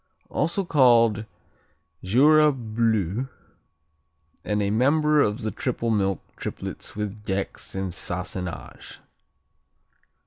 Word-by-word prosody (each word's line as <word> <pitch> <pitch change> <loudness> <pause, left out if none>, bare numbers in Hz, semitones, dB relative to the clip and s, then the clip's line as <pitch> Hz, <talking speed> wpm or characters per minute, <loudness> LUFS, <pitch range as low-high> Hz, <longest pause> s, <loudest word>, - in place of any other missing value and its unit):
Also 170 +6 0
called 115 -8 +4 0.8
Jura 150 +10 +5
Bleu, 115 - -1 1.2
and 105 0 -1
a 100 - 0
member 150 +6 +3
of 105 +1 0
the 110 - -1
triple 120 -2 -2
milk 95 -3 0
triplets - - -6
with 105 0 -5
Gex 95 -1 -4
and 95 -2 -3
Sassenage. 90 0 -5
110 Hz, 95 wpm, -25 LUFS, 100-130 Hz, 1.2 s, Jura